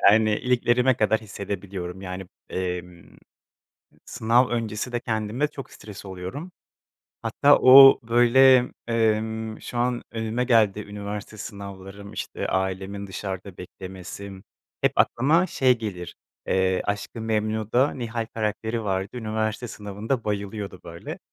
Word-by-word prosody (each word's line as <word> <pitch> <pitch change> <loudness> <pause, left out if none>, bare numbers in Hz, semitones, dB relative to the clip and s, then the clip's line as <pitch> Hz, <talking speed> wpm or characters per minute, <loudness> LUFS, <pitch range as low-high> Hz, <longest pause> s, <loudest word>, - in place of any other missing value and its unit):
Yani, 110 0 +4
iliklerime 125 +1 +2
kadar 110 +1 +2
hissedebiliyorum 100 -3 -6
yani, 95 0 -6 0.2
emm, 90 -2 -5 0.9
sınav 120 +3 +2
öncesi 115 0 -3
de 120 - -1
kendime 115 +5 -1
çok 135 - -9
stres 105 -2 -11
oluyorum. 95 - -7 0.7
Hatta 140 +6 +4
o 135 +1 +9
böyle, 120 +2 +5 0.2
emm, 110 -1 0
şu 120 - -6
an 120 0 0
önüme 115 +2 -1
geldi 110 -5 +3
üniversite 105 +1 -7
sınavlarım, 100 -1 -9
işte - - -4
ailemin 95 +1 -2
dışarıda 95 -1 -6
beklemesi 95 +2 -9 0.5
hep - - +3
aklıma 155 +9 +3
şey 130 -6 +2
gelir, 95 -6 -6 0.3
eee, 95 0 +1
Aşkı 105 +3 -3
Memnu'da 110 +4 0
Nihal 115 -2 -3
karakteri 110 +1 -2
vardı, 95 0 -1
üniversite 110 +1 -2
sınavında 110 +3 -4
bayılıyordu 100 -2 -4
böyle. 85 0 -8
110 Hz, 115 wpm, -25 LUFS, 100-120 Hz, 0.9 s, o